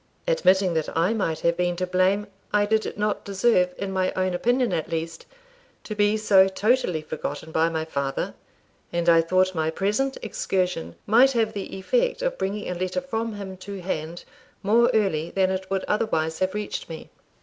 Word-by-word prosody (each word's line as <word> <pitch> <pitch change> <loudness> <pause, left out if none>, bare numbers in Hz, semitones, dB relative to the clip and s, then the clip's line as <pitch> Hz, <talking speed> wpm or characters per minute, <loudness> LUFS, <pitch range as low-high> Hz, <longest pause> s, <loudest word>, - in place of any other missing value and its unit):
Admitting 190 - +3
that 160 -2 -1
I 175 +6 +3
might 165 -8 -1
have 170 0 +2
been 175 0 0
to 185 +1 -1
blame, 185 +3 +2 0.3
I 205 0 +3
did 220 0 0
not 210 0 -1
deserve, 195 -2 +2
in 195 -1 -4
my 185 -1 0
own 185 -1 0
opinion 245 +7 +1
at 160 - -2
least, 165 0 -4 0.6
to 215 - -5
be 205 +1 +2
so 195 -3 +5
totally 195 -5 +1
forgotten 155 +1 -5
by 160 +1 +2
my 160 -1 -2
father; 140 -3 -2 0.6
and 170 0 -1
I 165 -1 +7
thought 185 +3 +2
my 160 -2 0
present 210 +11 -1
excursion 180 - -2
might 245 +6 +5
have 225 -2 +1
the 195 -1 -5
effect - - 0
of - - -1
bringing 205 +2 -2
a - - -2
letter 185 +6 -2
from 230 -5 -3
him 190 -2 -7
to 195 +1 -7
hand 170 -1 -4 0.4
more 230 +4 +4
early 170 -7 +1
than 190 -1 +1
it 190 0 -4
would 195 -1 -1
otherwise 160 -7 0
have 185 +1 0
reached 210 -4 -4
me. 160 -1 -9
190 Hz, 180 wpm, -24 LUFS, 170-210 Hz, 0.6 s, I